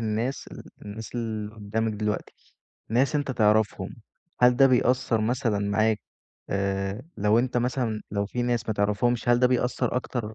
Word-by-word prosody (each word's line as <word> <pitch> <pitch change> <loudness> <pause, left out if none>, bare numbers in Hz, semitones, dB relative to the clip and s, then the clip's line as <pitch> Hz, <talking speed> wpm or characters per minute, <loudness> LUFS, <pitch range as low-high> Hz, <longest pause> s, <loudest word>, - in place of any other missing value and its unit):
الناس 115 +4 -2
ال - - -9 0.2
الناس 105 +3 -8
اللي 110 -3 -3
قدّامك 110 +1 -2
دلوقتي، 105 0 -3 0.6
ناس 125 +6 +2
أنت 145 -2 0
تعرفهم، 105 -4 +1 0.4
هل 125 0 +6
ده 135 - +7
بيأثر 125 -2 +2
مثلًا 115 -1 0
معاك 105 +2 +1 0.5
آآ 100 +2 -1
لو 105 +2 +3
أنت 125 +1 0
مثلًا 120 -3 -1
لو 100 0 -1
في 120 +4 -3
ناس 120 -1 0
ما 110 - 0
تعرفهمش، 105 +4 +1
هل 120 0 +5
ده 125 - +5
بيأثر 125 0 0
أكتر 120 -3 -3
110 Hz, 155 wpm, -26 LUFS, 105-125 Hz, 0.6 s, ده